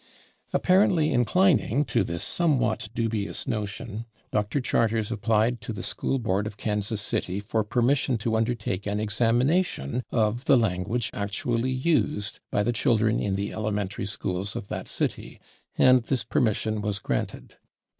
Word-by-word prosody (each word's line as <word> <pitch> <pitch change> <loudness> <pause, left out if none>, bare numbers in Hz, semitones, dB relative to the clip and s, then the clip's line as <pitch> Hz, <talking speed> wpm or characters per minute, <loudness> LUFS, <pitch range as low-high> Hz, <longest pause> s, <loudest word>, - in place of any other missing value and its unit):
Apparently 180 -5 +3
inclining 135 - +3
to 120 - +1
this 85 -1 -3
somewhat 150 - +1
dubious 115 -3 -2
notion, 105 +1 -4 0.2
Dr. 105 +6 0
Charters 115 -4 +1
applied 115 +2 +1
to - - -5
the 105 - -5
School 135 - -1
Board 105 -4 0
of 105 - -8
Kansas 105 0 -1
City 95 -1 -1
for 110 +2 -1
permission 125 +3 +1
to 110 +1 -1
undertake 110 -4 -1
an 105 +1 -1
examination 120 - +1
of 115 +2 0
the 135 - +6
language 110 +1 0
actually 115 +4 -1
used 130 -6 0
by 105 - +1
the 120 +3 0
children 115 -2 +2
in 100 -2 -1
the 100 +1 -3
elementary 105 -2 -2
schools 100 0 -3
of 100 - -6
that - - -5
city, - - -3 0.4
and 130 -1 +6
this 125 0 -1
permission 110 -1 0
was 105 -1 -1
granted. - - -4
110 Hz, 145 wpm, -26 LUFS, 105-125 Hz, 0.4 s, the